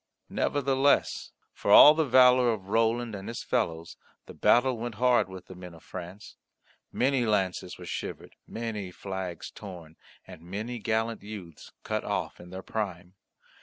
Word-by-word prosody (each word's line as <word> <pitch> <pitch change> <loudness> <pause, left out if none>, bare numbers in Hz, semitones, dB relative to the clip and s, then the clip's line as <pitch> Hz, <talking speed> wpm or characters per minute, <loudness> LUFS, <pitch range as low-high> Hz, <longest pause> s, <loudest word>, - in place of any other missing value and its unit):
Nevertheless, 140 0 +1 0.2
for - - -5
all 150 - +10
the 160 -1 0
valour 125 -1 +6
of 100 -4 -5
Roland 115 +1 +1
and 100 -1 -7
his 115 - -5
fellows 85 -9 -2 0.3
the - - -11
battle 125 +1 +3
went 120 -1 -5
hard 125 -2 +3
with 95 -1 -10
the - - -11
men 90 -1 -11
of 80 - -17
France. 95 +3 -9 0.5
Many 130 0 +1
lances 95 -5 -1
were - - -10
shivered, - - -6
many 110 -4 -5
flags 95 -2 -6
torn, 85 -6 -11 0.3
and 90 -3 -12
many 105 +8 -5
gallant 110 +1 -1
youths 100 -7 -10
cut - - -2
off - - -3
in 90 - -12
their 95 +1 -8
prime. 95 -4 -4
105 Hz, 155 wpm, -28 LUFS, 90-120 Hz, 0.5 s, all